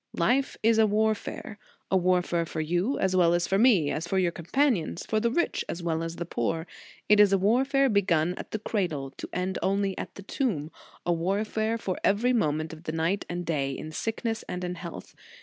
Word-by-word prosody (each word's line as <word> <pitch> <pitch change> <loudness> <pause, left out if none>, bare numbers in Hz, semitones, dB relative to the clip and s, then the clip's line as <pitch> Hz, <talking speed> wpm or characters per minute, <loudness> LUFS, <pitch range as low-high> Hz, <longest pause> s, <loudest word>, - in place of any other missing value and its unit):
Life 250 +10 +1
is 225 0 +4
a 220 - +6
warfare; 215 0 -1 0.3
a - - +4
warfare 180 -2 +2
for 160 - -5
you 175 - 0
as 190 -1 +1
well 175 -2 +4
as 175 0 +1
for 195 - +2
me, 205 - +4
as 160 +2 -3
for 190 - 0
your 180 -2 +2
companions, 175 - 0
for 220 - +1
the 235 +2 +1
rich 345 +9 0
as 170 - -4
well 165 -1 0
as 165 0 -4
the 170 - -4
poor. 160 +2 -2 0.4
It 210 0 +5
is 205 -1 +7
a 195 - +4
warfare 265 +8 +3
begun 180 -6 +2
at - - -8
the - - -2
cradle, 175 -11 -2
to - - -9
end 180 +1 -2
only 195 +1 0
at - - -6
the 195 - -9
tomb; 185 - -2 0.3
a 175 - +2
war 190 +6 0
fare 220 +1 -1
for 190 -5 -3
every 225 +6 +3
moment 155 -7 0
of 160 +1 -12
the - - -2
night 165 +5 -1
and 175 0 -3
day, 140 -4 -1
in 155 +3 -7
sickness 225 +5 -3
and 180 0 -4
in 180 0 -2
health. 170 -1 -8
185 Hz, 215 wpm, -27 LUFS, 165-215 Hz, 0.4 s, is